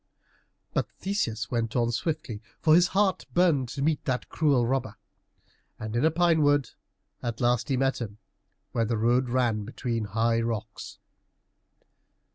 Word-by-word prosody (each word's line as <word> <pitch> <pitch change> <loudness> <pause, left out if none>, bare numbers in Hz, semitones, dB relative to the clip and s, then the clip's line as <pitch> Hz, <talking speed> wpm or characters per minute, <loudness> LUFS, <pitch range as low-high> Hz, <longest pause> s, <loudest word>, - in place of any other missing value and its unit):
But - - 0
Theseus 115 - -2
went 115 -2 -1
on 120 -1 +2
swiftly, 125 -5 -3 0.2
for 155 - +4
his 175 +2 +6
heart 195 0 +1
burned 160 -8 +3
to 135 - -3
meet 155 0 +1
that 125 -3 -2
cruel 140 -7 +2
robber. 120 -4 -1 0.8
And 110 +1 -5
in 120 - +1
a 160 - +5
pine 165 0 +3
wood 145 -2 +3 0.5
at 120 -1 -4
last 120 +2 +1
he 135 - +1
met 135 -1 0
him, 105 -3 -6 0.5
where 115 - 0
the 115 +1 -1
road 120 +3 +2
ran 120 -4 +1
between 115 0 -3
high 115 +3 +1
rocks. 115 -1 -5
125 Hz, 150 wpm, -27 LUFS, 115-150 Hz, 0.8 s, his